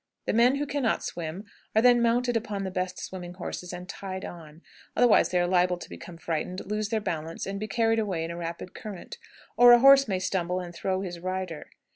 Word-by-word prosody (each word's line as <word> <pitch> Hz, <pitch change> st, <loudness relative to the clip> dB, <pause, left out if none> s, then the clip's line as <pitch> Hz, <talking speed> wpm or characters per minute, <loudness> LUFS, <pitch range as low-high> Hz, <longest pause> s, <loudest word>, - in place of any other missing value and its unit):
The -, -, 0 dB
men 240 Hz, +4 st, +5 dB
who 290 Hz, +1 st, -1 dB
can 285 Hz, 0 st, -2 dB
not 230 Hz, -, +1 dB
swim 170 Hz, +4 st, -5 dB, 0.3 s
are 220 Hz, -, +5 dB
then 245 Hz, -1 st, +6 dB
mounted 240 Hz, +1 st, +2 dB
upon 210 Hz, -3 st, -2 dB
the 190 Hz, -, -3 dB
best 185 Hz, 0 st, -3 dB
swimming 180 Hz, -1 st, -7 dB
horses 180 Hz, 0 st, -6 dB
and 180 Hz, 0 st, -7 dB
tied 190 Hz, -1 st, -6 dB
on, 160 Hz, -1 st, -11 dB, 0.3 s
otherwise 245 Hz, -2 st, +5 dB
they 180 Hz, -, +1 dB
are 175 Hz, -, +2 dB
liable 180 Hz, 0 st, +2 dB
to -, -, -10 dB
become 170 Hz, -, -9 dB
frightened, 165 Hz, +3 st, -3 dB
lose 210 Hz, +1 st, -2 dB
their 220 Hz, -, 0 dB
balance, 165 Hz, -5 st, -4 dB
and 195 Hz, +1 st, -4 dB
be 215 Hz, -, -4 dB
carried 225 Hz, +1 st, +2 dB
away 190 Hz, -7 st, -1 dB
in 165 Hz, -, -4 dB
a -, -, -6 dB
rapid 170 Hz, +2 st, -6 dB
current; 210 Hz, -7 st, -8 dB, 0.4 s
or 245 Hz, 0 st, +9 dB
a 240 Hz, -, +7 dB
horse 275 Hz, +1 st, +7 dB
may 190 Hz, -3 st, 0 dB
stumble 185 Hz, -1 st, -1 dB
and 175 Hz, -1 st, -7 dB
throw 185 Hz, +2 st, -2 dB
his 175 Hz, -3 st, -5 dB
rider. 185 Hz, -3 st, -4 dB
185 Hz, 220 wpm, -27 LUFS, 175-225 Hz, 0.4 s, or